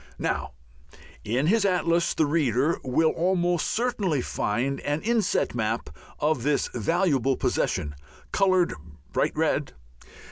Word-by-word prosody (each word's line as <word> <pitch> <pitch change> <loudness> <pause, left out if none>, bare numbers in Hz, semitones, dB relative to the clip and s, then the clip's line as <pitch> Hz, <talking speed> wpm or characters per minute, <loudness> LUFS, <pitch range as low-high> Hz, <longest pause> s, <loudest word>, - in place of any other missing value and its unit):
Now, - - -2 0.7
in 125 +7 0
his 215 +6 +3
atlas 170 -3 +1
the 160 - +3
reader 145 0 +1
will 155 +5 +2
almost 175 -1 +1
certainly 215 - 0
find 125 +4 -1
an 145 +2 -2
inset 230 -4 +1
map 110 -7 -2 0.3
of 150 -3 +1
this 145 +3 +1
valuable 135 - +1
possession, 75 - -1 0.4
coloured 185 -3 +3 0.4
bright - - 0
red. - - 0
155 Hz, 115 wpm, -26 LUFS, 130-180 Hz, 0.7 s, his